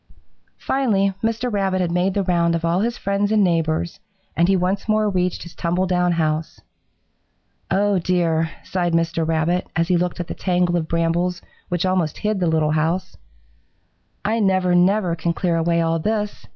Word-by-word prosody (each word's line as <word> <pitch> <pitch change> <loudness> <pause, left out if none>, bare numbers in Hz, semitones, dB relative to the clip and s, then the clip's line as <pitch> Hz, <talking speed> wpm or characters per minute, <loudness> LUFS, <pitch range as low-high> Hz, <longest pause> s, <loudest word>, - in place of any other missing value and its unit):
"Finally 205 -8 +1
Mr. 230 +1 -1
Rabbit 195 -2 0
had 175 -2 0
made 180 +2 0
the 200 - +1
round 170 -2 +1
of 165 0 -2
all 170 +2 +1
his 235 +3 -1
friends 200 +1 -1
and 215 -2 +4
neighbors, 165 +1 0 0.4
and 170 +1 +3
he 195 - +3
once 190 +4 -1
more 215 0 +2
reached 180 -2 -1
his 175 - -11
tumble 175 +3 -1
down 180 -1 +1
house. 155 -1 -1 1.1
'Oh, 200 +1 +2
dear,' 165 -2 +1
sighed 175 -2 -1
Mr. 165 -1 0
Rabbit, 165 +3 0
as 165 +2 0
he 180 - +3
looked 180 0 -2
at 175 - -2
the - - -6
tangle 180 -1 0
of 165 -2 -1
brambles 170 +2 0 0.3
which 175 0 -1
almost 185 -5 0
hid 210 -1 -1
the 180 - +1
little 160 -1 +2
old 155 - +1
house, 175 +4 -1 1.1
'I 220 +2 +1
never, 185 -3 +2
never 180 0 +3
can 170 +1 -1
clear 175 -1 0
away 170 +1 +1
all 165 0 +1
this! 210 +3 -2
180 Hz, 180 wpm, -21 LUFS, 165-195 Hz, 1.1 s, and